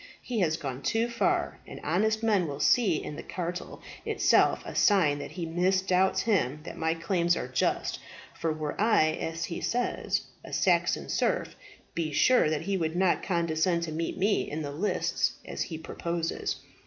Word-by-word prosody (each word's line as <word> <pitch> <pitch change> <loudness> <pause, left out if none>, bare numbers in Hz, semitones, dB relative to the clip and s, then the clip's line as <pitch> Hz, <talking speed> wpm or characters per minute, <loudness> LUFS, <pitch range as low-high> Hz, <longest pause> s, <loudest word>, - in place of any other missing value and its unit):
He 240 -3 -3
has 160 -4 +2
gone 135 -3 -5
too 225 - +1
far, 345 +9 0
and - - -8
honest 215 +8 +1
men 205 -6 +2
will 140 -1 -5
see 200 +1 +4
in 150 - -6
the - - -5
cartel 180 0 -5 0.2
itself - - +3
a - - -6
sign 165 -9 +4
that 140 - -7
he 175 -2 -4
misdoubts 185 +2 +2
him 150 - +1
that - - -7
my 160 0 0
claims 170 0 +1
are - - -3
just; 130 0 0 0.3
for 165 - -2
were 155 -1 -3
I, 215 -8 +4
as 165 +1 -3
he 170 - -5
says, 245 +1 0 0.2
a - - -10
Saxon - - +2
serf, - - 0 0.4
be 160 -2 -2
sure 250 - +4
that 155 -1 -1
he 195 0 -1
would 160 -2 -1
not 185 0 +2
condescend 170 -1 +1
to 165 - -3
meet 165 +2 -3
me 200 +2 +1
in 155 +1 -3
the 145 - -4
lists 175 +9 0
as - - -5
he 160 - -3
proposes. 170 +1 -3
170 Hz, 180 wpm, -28 LUFS, 155-195 Hz, 0.4 s, see